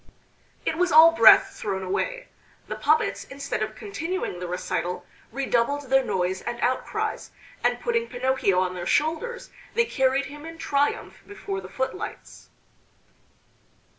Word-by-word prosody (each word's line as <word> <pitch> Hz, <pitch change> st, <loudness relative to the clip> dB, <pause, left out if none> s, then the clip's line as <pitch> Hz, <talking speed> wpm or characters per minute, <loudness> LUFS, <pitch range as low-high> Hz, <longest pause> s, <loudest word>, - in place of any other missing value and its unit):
It 320 Hz, -, -1 dB
was 360 Hz, -1 st, +2 dB
all 320 Hz, +2 st, +9 dB
breath 230 Hz, -9 st, +7 dB
thrown 195 Hz, -2 st, -4 dB
away. -, -, -2 dB, 0.4 s
The -, -, -4 dB
puppets, -, -, +1 dB
instead 275 Hz, -4 st, -5 dB
of 215 Hz, 0 st, -3 dB
continuing 365 Hz, -, -4 dB
the 180 Hz, -, -5 dB
recital, 180 Hz, 0 st, -3 dB, 0.3 s
redoubled 275 Hz, +1 st, -1 dB
their 270 Hz, 0 st, +5 dB
noise 185 Hz, -5 st, -1 dB
and 240 Hz, 0 st, -5 dB
outcries, 255 Hz, +1 st, -2 dB, 0.3 s
and -, -, +2 dB
putting 470 Hz, -1 st, 0 dB
Pinocchio 245 Hz, -7 st, +1 dB
on 185 Hz, -1 st, 0 dB
their 175 Hz, -1 st, -5 dB
shoulders 325 Hz, -, -1 dB, 0.2 s
they 470 Hz, 0 st, +4 dB
carried 265 Hz, -, +1 dB
him 295 Hz, +2 st, -10 dB
in 330 Hz, +1 st, -9 dB
triumph 290 Hz, -3 st, -1 dB
before 400 Hz, -1 st, -5 dB
the -, -, -10 dB
footlights. 265 Hz, +10 st, -5 dB
275 Hz, 135 wpm, -25 LUFS, 215-330 Hz, 0.4 s, all